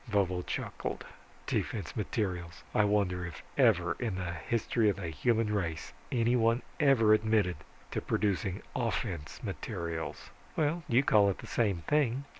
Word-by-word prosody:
Vovo 95 Hz, -4 st, +1 dB
chuckled, -, -, -4 dB, 0.4 s
"Defense -, -, -2 dB
materials. 90 Hz, -5 st, -3 dB
I 105 Hz, -, +4 dB
wonder 100 Hz, -3 st, +1 dB
if 85 Hz, -3 st, -7 dB
ever 90 Hz, 0 st, +4 dB
in 115 Hz, -6 st, -1 dB
the 90 Hz, -2 st, -3 dB
history 110 Hz, +5 st, +1 dB
of 100 Hz, -, +1 dB
the 95 Hz, -4 st, -4 dB
human 110 Hz, -, +1 dB
race 85 Hz, -6 st, -2 dB, 0.2 s
anyone 115 Hz, 0 st, +3 dB, 0.2 s
ever 130 Hz, -8 st, +5 dB
admitted 110 Hz, -5 st, +2 dB, 0.3 s
to -, -, -1 dB
producing 100 Hz, -2 st, -1 dB
offense 110 Hz, -, -2 dB
materials." 85 Hz, -2 st, -4 dB, 0.2 s
"Well, 160 Hz, +2 st, +1 dB
you 120 Hz, +3 st, +4 dB
call 105 Hz, -6 st, +5 dB
it 95 Hz, -, -1 dB
the -, -, -9 dB
same 100 Hz, -8 st, 0 dB
thing. 140 Hz, -3 st, +1 dB
105 Hz, 140 wpm, -31 LUFS, 90-115 Hz, 0.4 s, ever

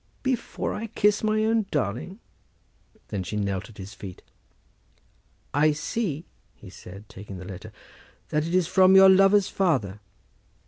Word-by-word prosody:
"Before 260 Hz, -3 st, -2 dB
I 225 Hz, +2 st, -5 dB
kiss 210 Hz, -1 st, +1 dB
my 215 Hz, 0 st, +1 dB
own 220 Hz, -2 st, +1 dB
darling?" 145 Hz, -, -3 dB, 0.9 s
Then 100 Hz, -, -3 dB
she 95 Hz, +3 st, -5 dB
knelt 100 Hz, -1 st, -2 dB
at 110 Hz, -, -16 dB
his 100 Hz, +1 st, -9 dB
feet. 95 Hz, -2 st, -10 dB, 1.3 s
"I 150 Hz, +2 st, +3 dB
see," 160 Hz, 0 st, -3 dB, 0.3 s
he -, -, -14 dB
said, 100 Hz, +3 st, -12 dB
taking 100 Hz, -1 st, -10 dB
the 90 Hz, -, -9 dB
letter; 100 Hz, +3 st, -9 dB, 0.6 s
"it 150 Hz, +1 st, 0 dB
is 180 Hz, +1 st, +2 dB
from 190 Hz, +2 st, +5 dB
your 190 Hz, 0 st, +9 dB
lover's 195 Hz, +1 st, +5 dB
father. 125 Hz, -, 0 dB
155 Hz, 140 wpm, -25 LUFS, -, 1.3 s, your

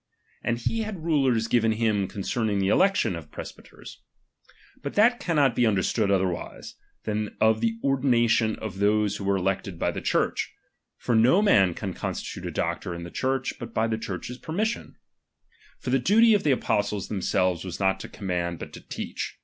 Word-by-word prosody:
And 120 Hz, -, 0 dB
he 225 Hz, -, -2 dB
had 210 Hz, -7 st, -5 dB
rules 135 Hz, -8 st, +2 dB
given 115 Hz, -1 st, +2 dB
him 110 Hz, -3 st, +1 dB
concerning 105 Hz, +1 st, -2 dB
the 95 Hz, 0 st, +1 dB
election 195 Hz, -, +3 dB
of 80 Hz, -3 st, -9 dB
presbyters. -, -, -11 dB, 0.8 s
But 140 Hz, -, -6 dB
RELIGION. 220 Hz, +4 st, +7 dB
'tliat 245 Hz, -, -16 dB
cannot 145 Hz, -8 st, +2 dB
be -, -, +1 dB
imderstood 105 Hz, -1 st, +2 dB
otherwise, 95 Hz, -3 st, -2 dB, 0.3 s
than 105 Hz, -1 st, -3 dB
of 110 Hz, 0 st, +3 dB
the 115 Hz, -1 st, 0 dB
or 135 Hz, 0 st, +2 dB
1 135 Hz, -, -6 dB
dinatioQ 115 Hz, -2 st, +3 dB
of 100 Hz, -3 st, -6 dB
those 105 Hz, 0 st, +2 dB
who 100 Hz, -, -6 dB
were 100 Hz, 0 st, +2 dB
elected 95 Hz, -1 st, -2 dB
by -, -, 0 dB
the -, -, -5 dB
Church; -, -, 0 dB, 0.2 s
' -, -, -45 dB
^ -, -, -25 dB
for 120 Hz, -, +1 dB
no 125 Hz, -, +5 dB
man 95 Hz, -, +4 dB
can 95 Hz, -3 st, -4 dB
coostitDte -, -, -5 dB
a -, -, -2 dB
doctor 90 Hz, -, -2 dB
in 85 Hz, -, -7 dB
the 85 Hz, -, -8 dB
Church, 130 Hz, 0 st, -1 dB
bat 120 Hz, -2 st, -8 dB
by 110 Hz, -, +2 dB
the 110 Hz, -1 st, -1 dB
Church's 110 Hz, +5 st, -6 dB
permis^ou. 210 Hz, +8 st, -3 dB, 0.8 s
For 125 Hz, -, -4 dB
the 135 Hz, -, +3 dB
doty 220 Hz, -, +5 dB
of 200 Hz, -7 st, +1 dB
ihe 140 Hz, -, +5 dB
apostles 105 Hz, -5 st, -1 dB
themselves 95 Hz, -3 st, 0 dB
was 95 Hz, -2 st, -6 dB
not 95 Hz, -1 st, +1 dB
to -, -, -8 dB
command, 85 Hz, -3 st, -3 dB
but -, -, -9 dB
to -, -, -9 dB
teach. -, -, -6 dB
110 Hz, 195 wpm, -26 LUFS, 95-130 Hz, 0.8 s, RELIGION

